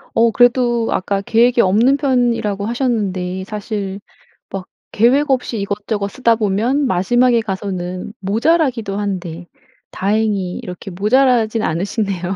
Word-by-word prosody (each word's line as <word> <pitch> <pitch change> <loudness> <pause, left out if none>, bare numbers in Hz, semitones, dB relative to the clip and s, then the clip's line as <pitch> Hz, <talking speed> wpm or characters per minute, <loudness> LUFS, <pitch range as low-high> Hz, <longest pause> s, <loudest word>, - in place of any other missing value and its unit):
어 230 0 +4
그래도 240 0 +2
아까 195 +1 -1
계획이 235 +3 +3
없는 225 +9 +3
편이라고 240 -7 0
하셨는데 195 -7 -2
사실 205 -2 -5 0.5
막 190 -1 -6 0.2
계획 270 +6 +3
없이 250 -3 -1
이것저것 200 +1 -2
쓰다 230 +1 +2
보면 225 +7 0
마지막에 240 +4 +2
가서는 190 -2 -5
모자라기도 230 - 0
한데 180 -4 -4 0.4
다행히 200 -2 -1
이렇게 180 -2 -8
모자라진 225 +2 +2
않으시네요. 190 +1 -2
215 Hz, 305 characters per minute, -18 LUFS, 195-240 Hz, 0.5 s, 어